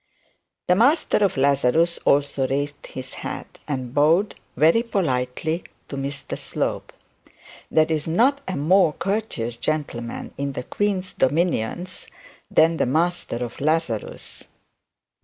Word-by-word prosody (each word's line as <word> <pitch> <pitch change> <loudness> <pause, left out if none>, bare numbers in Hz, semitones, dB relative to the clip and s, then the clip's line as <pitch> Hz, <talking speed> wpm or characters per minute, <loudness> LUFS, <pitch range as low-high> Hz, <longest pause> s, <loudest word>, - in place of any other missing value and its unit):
The 180 - +5
master 270 - +3
of 200 -7 +1
Lazarus 140 +5 +3
also 140 -1 +2
raised 145 +2 -3
his 130 0 -8
hat - - -7
and 130 -4 -3
bowed 160 +8 +3 0.2
very 165 +9 +5
politely 160 - -1 0.3
to - - -5
Mr 140 0 -4
Slope. - - -3 0.8
There 155 - +4
is 155 -1 -1
not 255 - +3
a 185 - -2
more 165 +2 +4
courteous 170 - -2
gentleman 125 -6 -3
in 140 0 -2
the 125 - -4
queen's 195 +3 -1
dominions 170 +3 0 0.4
than 165 +1 +4
the - - +1
master 160 -4 0
of 120 - -10
Lazarus. 155 -7 -2
155 Hz, 120 wpm, -23 LUFS, 135-180 Hz, 0.8 s, The